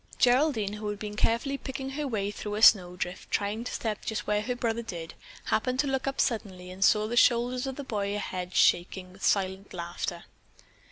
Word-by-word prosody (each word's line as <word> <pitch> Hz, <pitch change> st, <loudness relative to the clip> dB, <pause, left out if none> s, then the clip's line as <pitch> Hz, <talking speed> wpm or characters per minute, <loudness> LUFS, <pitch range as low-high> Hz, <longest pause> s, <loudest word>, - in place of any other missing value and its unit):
Geraldine, 245 Hz, -5 st, +3 dB
who 210 Hz, 0 st, -5 dB
had 205 Hz, -, -3 dB
been 210 Hz, 0 st, -6 dB
carefully 235 Hz, +6 st, 0 dB
picking 265 Hz, 0 st, -5 dB
her 290 Hz, +1 st, -3 dB
way 205 Hz, -5 st, -1 dB
through 210 Hz, 0 st, -5 dB
a 215 Hz, -, -2 dB
snowdrift, 180 Hz, -3 st, +4 dB
trying 210 Hz, +3 st, -1 dB
to -, -, -4 dB
step 215 Hz, -2 st, -3 dB
just 220 Hz, -, -3 dB
where 210 Hz, 0 st, +1 dB
her 245 Hz, +4 st, -2 dB
brother 235 Hz, -1 st, -1 dB
did, 170 Hz, -7 st, -7 dB, 0.3 s
happened 255 Hz, -1 st, 0 dB
to -, -, -3 dB
look 270 Hz, -1 st, -1 dB
up 275 Hz, -, -2 dB
suddenly 190 Hz, -7 st, -1 dB
and 190 Hz, +1 st, -2 dB
saw 210 Hz, +2 st, +4 dB
the 235 Hz, -, -3 dB
shoulders 245 Hz, +1 st, +3 dB
of 265 Hz, -, -4 dB
the 285 Hz, -, -6 dB
boy 205 Hz, -5 st, -2 dB
ahead 185 Hz, -3 st, -4 dB
shaking 180 Hz, +1 st, +2 dB
with 195 Hz, -, -14 dB
silent 190 Hz, -1 st, 0 dB
laughter. 170 Hz, 0 st, -4 dB
210 Hz, 200 wpm, -28 LUFS, 190-250 Hz, 0.3 s, snowdrift